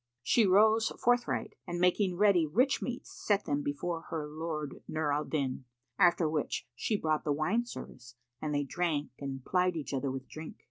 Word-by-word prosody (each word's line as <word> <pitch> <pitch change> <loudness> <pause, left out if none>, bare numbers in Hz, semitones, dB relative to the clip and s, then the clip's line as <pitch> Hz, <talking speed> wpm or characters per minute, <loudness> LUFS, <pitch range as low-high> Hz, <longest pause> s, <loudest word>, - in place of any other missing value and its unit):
She 225 - +4
rose 215 +4 +5
forthright 245 0 +1
and 175 0 -3
making 180 +1 +2
ready 195 -5 +4
rich 250 - +2
meats, 245 -1 -5
set 205 -2 0
them 145 0 0
before 165 +4 -2
her 155 -2 -3
lord 155 -1 -5
Nur 155 -2 0
al 150 +1 0
Din; 135 -4 -2 0.3
after 175 -3 +5
which 155 -1 -2
she 215 - -1
brought 155 -4 0
the 150 - 0
wine 185 +12 +1
service 120 - -9 0.3
and 155 - -2
they 145 -1 +1
drank 150 0 -1
and 135 -2 -5
plied 180 -1 +2
each 150 -3 -4
other 135 0 -1
with 130 0 -5
drink. 155 0 -8
160 Hz, 180 wpm, -31 LUFS, 145-190 Hz, 0.3 s, rose